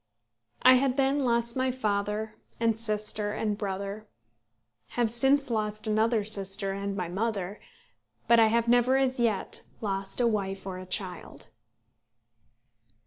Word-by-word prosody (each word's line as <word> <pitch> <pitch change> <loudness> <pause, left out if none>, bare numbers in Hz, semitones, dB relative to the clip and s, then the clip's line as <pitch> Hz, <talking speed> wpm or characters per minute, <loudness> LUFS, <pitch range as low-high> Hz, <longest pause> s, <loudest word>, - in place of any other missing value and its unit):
I 255 - +9
had 270 -1 0
then 275 +1 +2
lost 235 -1 0
my 260 0 +1
father, 215 -3 -2 0.3
and 230 -1 +2
sister, 210 -1 +1
and 210 -1 -1
brother, 200 +1 -5 0.9
have 235 -2 +2
since 270 +3 +2
lost 215 -1 -2
another 220 +1 +1
sister 195 -1 0
and 200 0 -4
my 180 -3 -2
mother; 200 +1 -3 0.7
but 235 0 +6
I 225 - +6
have 230 +1 +1
never 245 +2 +4
as 260 -1 +1
yet 225 -4 0 0.2
lost 195 -1 -4
a 245 - +3
wife 195 -4 -1
or 185 -1 -5
a 185 - -10
child. 185 -1 -4
215 Hz, 140 wpm, -28 LUFS, 200-235 Hz, 0.9 s, I